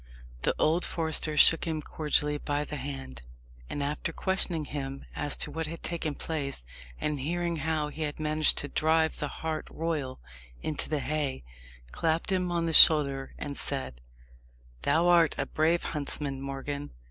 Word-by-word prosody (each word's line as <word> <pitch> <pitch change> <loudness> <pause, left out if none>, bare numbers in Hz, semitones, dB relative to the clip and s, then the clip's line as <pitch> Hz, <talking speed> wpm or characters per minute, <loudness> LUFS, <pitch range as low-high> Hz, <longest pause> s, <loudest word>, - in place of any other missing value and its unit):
The - - +1
old 165 +3 +2
forester 160 -2 -2
shook 165 +3 +8
him 160 -2 -2
cordially 150 -1 -1
by 145 0 -1
the 150 - -6
hand, 135 - -6 0.5
and 145 - -3
after 150 +3 -2
questioning 175 -3 0
him 135 -1 -5
as 145 - -1
to - - -2
what 160 -1 -3
had 165 +2 -8
taken 160 -3 -3
place, 140 - -3 0.3
and 150 -1 -2
hearing 170 +4 -1
how 155 0 -1
he 155 +2 -8
had 150 -1 -3
managed 155 0 +3
to 145 - 0
drive 160 +2 +1
the 145 - -1
hart 160 +2 -4
royal 155 -6 -3 0.4
into 155 - -2
the 150 -2 -1
haye, 145 -2 -2 0.5
clapped 165 +4 -1
him 180 -2 0
on 170 -1 0
the 165 - -1
shoulder 140 -4 +7
and 140 -1 -5
said, 130 - -3 0.8
"Thou 170 - +2
art 170 -2 +5
a - - 0
brave 165 +2 +1
huntsman, 140 -2 -3
Morgan. 140 +1 -5
150 Hz, 160 wpm, -29 LUFS, 140-160 Hz, 0.8 s, shook